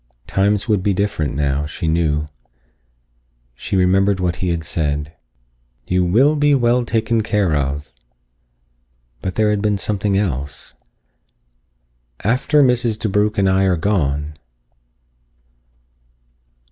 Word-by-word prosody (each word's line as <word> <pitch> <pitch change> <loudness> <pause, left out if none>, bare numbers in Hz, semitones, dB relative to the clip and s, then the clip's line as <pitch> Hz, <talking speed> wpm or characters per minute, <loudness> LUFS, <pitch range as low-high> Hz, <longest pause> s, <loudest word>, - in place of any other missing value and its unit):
Times 100 +2 0
would 105 -4 +1
be 100 0 0
different 95 -8 -1
now, 70 0 -1
she 80 +2 -5
knew. 80 -2 +1 1.3
She - - -5
remembered 95 +1 +2
what 90 -3 -1
he 90 - -2
had 85 -1 -2
said. 75 -1 -2 0.7
"You 90 0 +1
will 125 +13 +3
be 145 -1 +3
well 120 -1 +2
taken 115 -1 0
care 105 -7 0
of." 70 0 -3 1.3
But 95 - -4
there 110 -1 +2
had 105 -1 0
been 105 -1 +1
something 100 0 -1
else. 70 -8 -3 1.5
"After 130 +7 +2
_Mrs. 120 -4 +1
DeBrugh+ 105 +1 0
and 100 -1 +2
I 95 +1 +3
are 90 -2 +2
gone." 75 -5 -1
95 Hz, 120 wpm, -19 LUFS, 80-105 Hz, 1.5 s, will